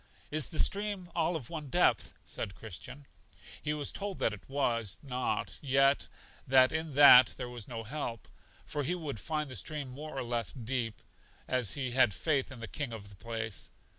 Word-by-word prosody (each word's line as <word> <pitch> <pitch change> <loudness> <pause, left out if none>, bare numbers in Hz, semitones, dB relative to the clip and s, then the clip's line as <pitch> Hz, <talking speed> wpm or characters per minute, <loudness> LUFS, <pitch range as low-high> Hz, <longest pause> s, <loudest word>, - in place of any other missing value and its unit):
Is 155 -1 +2
the 160 - -7
stream 200 -2 0
all 170 +1 +1
of 135 -8 -6
one 155 -4 -5
depth? - - +2
said 100 - -5
Christian. 125 +7 -8 0.6
He 150 - -2
was 150 -2 -1
told 200 -2 -4
that 110 - +1
it 105 - -12
was 115 -7 0
not, 130 -2 -2
yet 135 0 +3 0.4
that 130 0 +6
in 160 -2 -2
that 135 -3 +9
there 125 - -4
was 120 -4 -8
no 115 -2 -5
help, 115 -2 -4 0.4
for 145 - -3
he 165 +6 -1
would 150 - -5
find 155 +3 -2
the 130 - -6
stream 145 - -3
more 145 +3 -8
or - - -1
less 120 -2 0
deep, 120 -2 -3 0.4
as 125 -6 +1
he 130 -3 -2
had 120 -6 +4
faith 145 - 0
in 125 -3 -8
the 115 - -4
King 140 -2 -3
of 100 -2 -8
the 100 - -13
place. 110 0 -4
130 Hz, 190 wpm, -31 LUFS, 115-150 Hz, 0.6 s, that